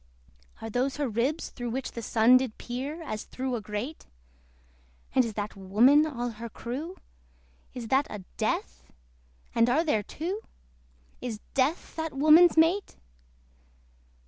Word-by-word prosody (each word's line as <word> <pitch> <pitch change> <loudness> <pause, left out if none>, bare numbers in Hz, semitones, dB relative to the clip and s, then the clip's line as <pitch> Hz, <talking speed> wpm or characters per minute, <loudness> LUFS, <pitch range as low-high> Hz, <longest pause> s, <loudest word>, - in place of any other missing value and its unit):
Are 225 - -4
those 260 +4 0
her 290 -2 0
ribs 245 +8 -1
through 245 -1 -5
which 260 +3 -3
the 235 - -6
Sun 230 +3 +5
Did 255 -4 -3
peer, 275 +7 -5
as 215 -8 -4
through 260 -1 -3
a 230 - -3
grate? 210 +9 -5 1.1
And 260 - +5
is 225 -3 -4
that 205 0 -4
Woman 235 +11 +4
all 245 -5 -3
her 235 - -5
crew? 280 - -6 0.8
Is 235 -3 -6
that 270 +2 +3
a 210 -3 -7
DEATH? - - -2 0.6
and 230 +1 +4
are 295 +7 +3
there 295 -10 +1
two? 350 - -4 0.8
Is 235 -4 -4
DEATH 275 +6 0
that 320 -2 -3
woman's 315 +4 +7
mate? 335 +5 +3
255 Hz, 145 wpm, -28 LUFS, 230-305 Hz, 1.1 s, woman's